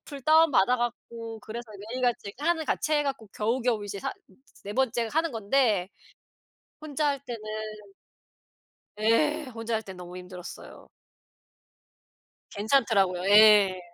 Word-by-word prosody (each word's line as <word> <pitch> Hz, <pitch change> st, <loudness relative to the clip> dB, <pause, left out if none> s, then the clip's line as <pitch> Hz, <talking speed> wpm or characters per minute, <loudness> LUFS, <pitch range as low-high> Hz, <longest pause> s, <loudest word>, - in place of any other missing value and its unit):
앱 275 Hz, -, -10 dB
다운 320 Hz, 0 st, +6 dB
받아 245 Hz, +3 st, +4 dB
갖고 230 Hz, -2 st, -5 dB
그래서 225 Hz, +1 st, -8 dB, 0.2 s
매일 255 Hz, +1 st, -4 dB
같이 235 Hz, -5 st, -1 dB
하면 320 Hz, +1 st, 0 dB
같이 310 Hz, -, -1 dB
해 295 Hz, -1 st, +2 dB
갖고 270 Hz, -6 st, -4 dB
겨우겨우 230 Hz, 0 st, 0 dB
이제 200 Hz, -1 st, -6 dB
4 -, -, -3 dB
으 -, -, -5 dB, 0.5 s
4 205 Hz, -, -5 dB
번째 235 Hz, -3 st, 0 dB
하는 320 Hz, 0 st, 0 dB
건데 215 Hz, -4 st, +1 dB, 0.9 s
혼자 305 Hz, 0 st, -2 dB
할 280 Hz, -1 st, -1 dB
때는 240 Hz, -4 st, -6 dB, 1.6 s
예. 295 Hz, +8 st, +2 dB
혼자 225 Hz, 0 st, -3 dB
할 220 Hz, -, -1 dB
때는 190 Hz, -3 st, -10 dB
너무 180 Hz, 0 st, -9 dB
힘들었어요. 180 Hz, 0 st, -10 dB, 1.6 s
괜찮더라고요. 200 Hz, -5 st, +1 dB
예. 205 Hz, -3 st, +7 dB
230 Hz, 255 characters per minute, -27 LUFS, 205-275 Hz, 1.6 s, 예